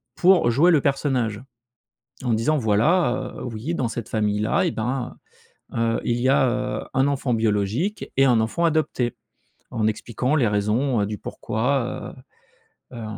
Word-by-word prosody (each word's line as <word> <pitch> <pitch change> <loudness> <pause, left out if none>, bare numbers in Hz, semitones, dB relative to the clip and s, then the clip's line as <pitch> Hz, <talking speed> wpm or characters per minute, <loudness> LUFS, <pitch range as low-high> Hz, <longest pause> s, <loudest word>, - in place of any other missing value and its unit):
pour 180 -8 +4
jouer 165 +9 +4
le 155 - +5
personnage 130 -6 0 0.8
en 120 - +1
disant 115 +8 +1
voilà, 125 - +1
heu: - - -7
«Oui, 120 +8 -4
dans 130 -7 -1
cette 115 -1 -5
famille-là, 105 -1 +1
eh - - 0
ben, 125 +3 -3 0.6
heu - - -4
heu, 115 0 +1
il 120 - 0
y 130 - +1
a, 135 -1 +4 0.3
heu, - - -8
un 135 +1 +3
enfant 135 -3 0
biologique 110 - -1
et 135 - +5
un 120 -3 +4
enfant 115 +10 -1
adopté», 150 -7 0 0.6
en 110 -1 -1
expliquant 120 +5 -2
les 120 -7 +3
raisons, 105 +4 +1
heu, - - 0
du 105 -1 -5
pourquoi, 125 +3 -2 0.8
heu - - -9
heu, 110 - -6
120 Hz, 165 wpm, -23 LUFS, 110-140 Hz, 0.8 s, le